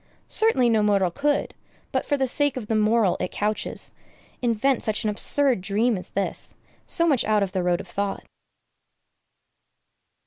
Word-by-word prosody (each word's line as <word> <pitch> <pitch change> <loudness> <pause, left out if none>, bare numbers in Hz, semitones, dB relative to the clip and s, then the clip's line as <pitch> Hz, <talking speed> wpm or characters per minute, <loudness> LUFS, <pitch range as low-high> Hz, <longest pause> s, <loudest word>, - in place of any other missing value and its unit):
Certainly 350 - +3
no 220 -2 +3
mortal 200 -4 +2
could, 285 +6 -1 0.4
but - - -1
for 285 - +1
the 265 - +1
sake 290 +1 +1
of 240 - -5
the 220 - -2
moral 215 -2 +2
it - - -2
couches, 210 +1 -2 0.5
invent 240 +2 +1
such 215 -1 -1
an 215 - +1
absurd 260 +1 +2
dream 210 +5 +1
as 180 - -7
this, 200 0 -2 0.3
so 335 - 0
much 280 -7 +3
out 210 -1 +2
of 190 - -3
the 185 - -1
road 175 0 +1
of - - -8
thought! 200 0 -3
215 Hz, 165 wpm, -24 LUFS, 200-265 Hz, 0.5 s, Certainly